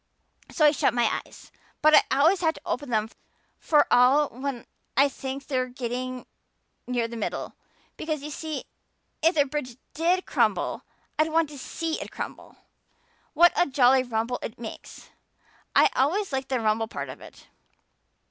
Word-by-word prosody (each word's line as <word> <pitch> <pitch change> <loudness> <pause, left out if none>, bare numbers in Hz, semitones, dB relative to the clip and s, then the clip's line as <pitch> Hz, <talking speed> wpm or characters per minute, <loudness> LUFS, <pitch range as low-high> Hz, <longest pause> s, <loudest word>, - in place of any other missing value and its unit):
So 310 - +2
I 300 - +7
shut 280 - +1
my 235 -2 +1
eyes. - - -16 0.3
But 310 0 +6
I - - +8 0.2
always 345 +6 +4
have 320 -2 +1
to - - -12
open 295 -5 -3
them 220 -2 +1 0.5
for 300 -2 +4
all 270 +4 +5
when 260 -1 -5 0.3
I 275 +2 +6
think 275 0 -6
we're 255 -3 0
getting 250 0 -5 0.6
near 245 -2 0
the 235 - -8
middle. 225 - -4 0.4
Because, 310 -2 -3
you 300 - -6
see, 310 -2 -5 0.6
if 330 +3 +3
the 290 -2 +4
bridge 265 -4 -5 0.2
did 350 +4 +1
crumple - - +1
up - - -47 0.3
I'd 310 +1 +2
want 325 -1 +2
to 295 - -10
see 325 +4 -4
it - - -6
crumple. - - -8 0.8
What 345 +3 +6
a 350 - +3
jolly 260 -1 +5
rumble 240 0 -2
it 230 - -6
makes! 230 -2 -10 0.6
I - - +6
always 335 +6 +1
like 265 0 -2
the 260 -2 0
rumble 220 0 +1
part - - -6
of - - -9
it. - - -14
270 Hz, 165 wpm, -26 LUFS, 245-310 Hz, 0.8 s, I